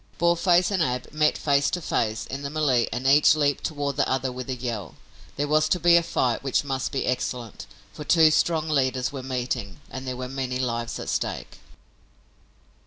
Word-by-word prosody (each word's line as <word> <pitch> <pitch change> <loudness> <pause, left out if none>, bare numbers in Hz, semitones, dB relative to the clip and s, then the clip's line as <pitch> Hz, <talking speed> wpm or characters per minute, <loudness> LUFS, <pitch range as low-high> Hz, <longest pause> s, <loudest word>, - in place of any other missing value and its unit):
Boarface 175 +2 +3
and 190 -3 0
Ab 125 -4 -1
met 150 0 +2
face 140 -1 +2
to 180 - -2
face 110 -9 -1
in 135 +2 -6
the 140 - -4
melée 140 -6 +1
and 125 +3 -4
each 145 +3 +6
leaped 145 -2 0
toward 145 -3 -3
the - - +1
other 130 0 -1
with 125 +1 -7
a 130 - -1
yell. 115 -8 -5 0.4
There 145 +1 -1
was 155 +1 +2
to 180 - +2
be 175 0 +5
a 170 - +6
fight 125 -8 -1
which 135 0 0
must 135 -2 -3
be 135 - -2
excellent, 125 -2 -3 0.3
for 150 - -8
two 160 0 +5
strong 160 0 +1
leaders 130 -4 0
were 135 -2 -6
meeting 125 -3 -4
and 130 0 -7
there 130 -1 -4
were 130 0 -5
many 130 -1 -3
lives 120 -2 -2
at - - -7
stake. - - -3
135 Hz, 195 wpm, -25 LUFS, 125-155 Hz, 0.4 s, each